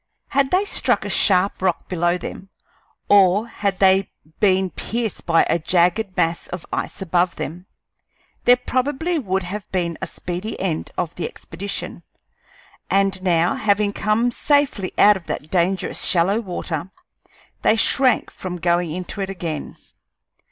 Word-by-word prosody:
Had 275 Hz, -1 st, +2 dB
they 375 Hz, +5 st, +2 dB
struck -, -, +1 dB
a -, -, -3 dB
sharp 190 Hz, -1 st, +2 dB
rock 185 Hz, -3 st, 0 dB
below 175 Hz, 0 st, +1 dB
them, 190 Hz, +2 st, -8 dB, 0.6 s
or 200 Hz, +2 st, +5 dB
had 200 Hz, -4 st, -2 dB
they 190 Hz, 0 st, +4 dB, 0.3 s
been 190 Hz, -2 st, +3 dB
pierced 225 Hz, -3 st, -4 dB
by 165 Hz, -1 st, +5 dB
a 170 Hz, -, +1 dB
jagged 180 Hz, +4 st, +1 dB
mass 165 Hz, -1 st, 0 dB
of 180 Hz, -1 st, -7 dB
ice -, -, -3 dB
above 175 Hz, 0 st, +1 dB
them, 175 Hz, +5 st, -6 dB, 0.8 s
there 245 Hz, -, +7 dB
probably 280 Hz, +7 st, -1 dB
would 190 Hz, -6 st, -1 dB
have 195 Hz, +3 st, -7 dB
been 170 Hz, -3 st, -2 dB
a 190 Hz, -, -2 dB
speedy 180 Hz, +6 st, -5 dB
end 175 Hz, -5 st, -2 dB
of 170 Hz, -, -2 dB
the 180 Hz, -, -3 dB
expedition; 195 Hz, +4 st, -6 dB, 0.9 s
and 195 Hz, -1 st, +2 dB
now, 175 Hz, -2 st, +2 dB
having 205 Hz, -1 st, +1 dB
come 215 Hz, +5 st, +1 dB
safely 285 Hz, -8 st, +1 dB
out 210 Hz, 0 st, +6 dB
of 170 Hz, -, -15 dB
that 150 Hz, -, -5 dB
dangerous 185 Hz, +1 st, 0 dB
shallow 190 Hz, +4 st, +3 dB
water, 175 Hz, -5 st, -4 dB, 0.7 s
they -, -, +4 dB
shrank 255 Hz, +3 st, +2 dB
from 185 Hz, -1 st, -6 dB
going 175 Hz, 0 st, +1 dB
into 180 Hz, +4 st, -5 dB
it 195 Hz, -, -3 dB
again. 170 Hz, -6 st, -5 dB
190 Hz, 145 wpm, -21 LUFS, 175-210 Hz, 0.9 s, there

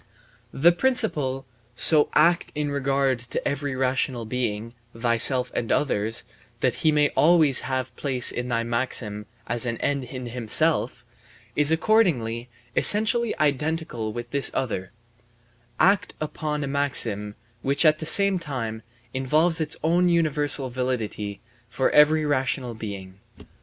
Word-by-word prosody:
The 165 Hz, +6 st, +4 dB
principle: 170 Hz, -, -1 dB, 0.3 s
"So 150 Hz, +3 st, +4 dB
act 170 Hz, +3 st, +2 dB
in 150 Hz, -1 st, -2 dB
regard 135 Hz, -2 st, 0 dB
to 120 Hz, 0 st, -4 dB
every 145 Hz, -1 st, -3 dB
rational 130 Hz, -2 st, -1 dB
being 115 Hz, -1 st, -4 dB, 0.2 s
(thyself 120 Hz, +2 st, +3 dB
and 115 Hz, -, -3 dB
others), 115 Hz, -5 st, 0 dB, 0.4 s
that 125 Hz, -, +1 dB
he 155 Hz, -, +3 dB
may 150 Hz, -1 st, +2 dB
always 155 Hz, -4 st, +4 dB
have 130 Hz, -2 st, -4 dB
place 130 Hz, -4 st, +3 dB
in 125 Hz, 0 st, -4 dB
thy 115 Hz, -1 st, -1 dB
maxim 115 Hz, -3 st, -2 dB, 0.2 s
as 120 Hz, +1 st, -1 dB
an 115 Hz, -1 st, -3 dB
end 140 Hz, 0 st, -2 dB
in 125 Hz, 0 st, -8 dB
himself," 120 Hz, -2 st, +1 dB, 0.5 s
is 150 Hz, +1 st, +2 dB
accordingly 155 Hz, -, +1 dB, 0.3 s
essentially 220 Hz, +2 st, +3 dB
identical 150 Hz, -6 st, -2 dB
with 120 Hz, +2 st, -8 dB
this 140 Hz, -1 st, +1 dB
other: 110 Hz, -8 st, -3 dB, 0.9 s
"Act 195 Hz, +1 st, +2 dB
upon 150 Hz, -1 st, -4 dB
a -, -, -3 dB
maxim 115 Hz, -7 st, +1 dB, 0.3 s
which, 140 Hz, +4 st, 0 dB
at 155 Hz, 0 st, +4 dB
the 155 Hz, -, -4 dB
same 200 Hz, 0 st, +3 dB
time, 115 Hz, -8 st, -5 dB, 0.3 s
involves 155 Hz, +6 st, +1 dB
its 155 Hz, 0 st, 0 dB
own 175 Hz, +3 st, +2 dB
universal 150 Hz, -5 st, 0 dB
validity 115 Hz, -5 st, -4 dB, 0.3 s
for 130 Hz, +3 st, 0 dB
every 150 Hz, +1 st, +4 dB
rational 130 Hz, -3 st, -1 dB
being." 100 Hz, -4 st, -8 dB
135 Hz, 130 wpm, -24 LUFS, 120-155 Hz, 0.9 s, The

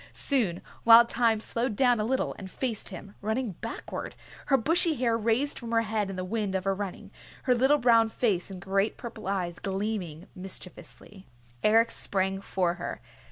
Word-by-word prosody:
Soon, 220 Hz, -, +1 dB, 0.2 s
Wild 235 Hz, +1 st, +8 dB
Thyme 230 Hz, -2 st, +2 dB
slowed 230 Hz, +1 st, -2 dB
down 245 Hz, -1 st, +3 dB
a -, -, +1 dB
little, 260 Hz, +4 st, 0 dB
and 190 Hz, -, -8 dB
faced 230 Hz, 0 st, -3 dB
him, 195 Hz, +1 st, -9 dB
running 220 Hz, +2 st, -1 dB
backward, -, -, -6 dB, 0.3 s
her 270 Hz, -, +4 dB
bushy 330 Hz, +5 st, +2 dB
hair 235 Hz, -3 st, +1 dB
raised 230 Hz, +6 st, 0 dB
from 235 Hz, -, -7 dB
her 230 Hz, 0 st, +2 dB
head 215 Hz, -2 st, -1 dB
in 195 Hz, -, -5 dB
the 185 Hz, 0 st, -4 dB
wind 205 Hz, -1 st, -2 dB
of 190 Hz, -, -1 dB
her 195 Hz, 0 st, +1 dB
running, 195 Hz, -1 st, -6 dB, 0.3 s
her 255 Hz, -, +3 dB
little 265 Hz, +4 st, +4 dB
brown 230 Hz, -4 st, +4 dB
face 205 Hz, -6 st, 0 dB
and 190 Hz, -2 st, -8 dB
great 195 Hz, +3 st, 0 dB
purple 225 Hz, -4 st, -8 dB
eyes 180 Hz, -3 st, -2 dB
gleaming 195 Hz, -4 st, -3 dB
mischievously. 190 Hz, +1 st, -7 dB, 0.3 s
Eric 225 Hz, +2 st, +4 dB
sprang 195 Hz, 0 st, 0 dB
for 180 Hz, -3 st, 0 dB
her. -, -, -4 dB
215 Hz, 175 wpm, -28 LUFS, 195-235 Hz, 0.3 s, Wild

